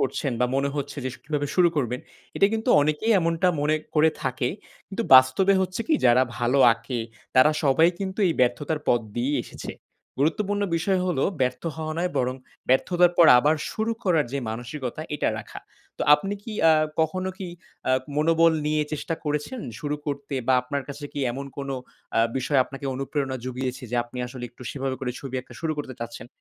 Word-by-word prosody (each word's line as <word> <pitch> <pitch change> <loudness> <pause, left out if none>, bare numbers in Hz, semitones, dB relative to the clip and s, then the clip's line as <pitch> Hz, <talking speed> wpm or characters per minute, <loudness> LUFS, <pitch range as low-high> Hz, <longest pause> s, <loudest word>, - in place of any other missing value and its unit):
করছেন 135 0 -1
বা 125 - +4
মনে 140 +1 +1
হচ্ছে 145 +1 -4
যে - - 0
শু - - -14
কিভাবে 150 -1 -1
শুরু 180 -2 +5
করবেন 125 -2 -1 0.4
এটা 195 - +5
কিন্তু 220 +2 -3
অনেকেই 155 +10 +1
এমনটা 165 +1 +1
মনে 150 +1 +2 0.2
করে 155 +1 +5
থাকে 130 -1 -1 0.4
কিন্তু 205 +4 -3
বাস্তবে 130 +10 +6
হচ্ছে 185 +3 -2
কি 320 - +4
যারা 125 +1 +5 0.2
ভালো 125 +3 +2
আঁকে, 115 +2 -5 0.4
তারা 130 +4 +7
সবাই 155 +4 +5
কিন্তু 190 0 -4
এই - - +2
ব্যর্থতার 145 +5 +1
পথ 120 - +4
দিয়েই 130 +5 0
এসেছে। - - -8 0.5
গুরুত্বপূর্ণ 205 +7 +1
বিষয় 185 +3 +1
হলো 170 -7 +1 0.2
ব্যর্থ 125 -1 0
হওয়া 155 -1 -3
নয় 180 +1 0
বরং 125 0 0 0.3
ব্যর্থতার 175 +7 +4
পর 170 - +8
আবার 150 +5 +3 0.2
শুরু 220 +1 -1
করার 165 -6 +3
যে 140 - -1
মানসিকতা 125 +5 -5
এটা - - 0
রাখা। 105 - -9 0.4
তো - - -1
আপনি 195 +6 -2
কি 225 - -7
অ্যা 165 0 +7 0.3
কখনো 185 +4 0
কি 190 - -5 0.4
আ - - +3 0.3
মনোবল 165 +2 +4
নিয়ে 150 0 +2
চেষ্টা 155 +2 -2
করেছেন 150 - -2 0.2
শুরু 150 0 -2
করতে 140 0 -4
বা 130 - +4
আপনার 140 +2 -3
কাছে 145 +1 -7
কি 145 - -4
এমন 140 +3 -5
কোন 140 -1 -5 0.4
অ্যা - - +3 0.2
বিষয় 135 +2 +1
আপনাকে 140 +1 -8
অনুপ্রেরণা 135 0 -2
জুগিয়েছে 130 +1 -4
যে 125 - -1
আপনি 120 +1 -10
আসলে 125 0 -7
একটু 125 - -14
সেভাবে 135 -1 -3
করে 125 -2 -2
ছবি 135 -2 -7
আঁকা 130 - -15
শুরু 160 -1 -1
করতে 135 -3 -5
চাচ্ছেন? 115 0 -6
145 Hz, 185 wpm, -25 LUFS, 130-165 Hz, 0.5 s, পর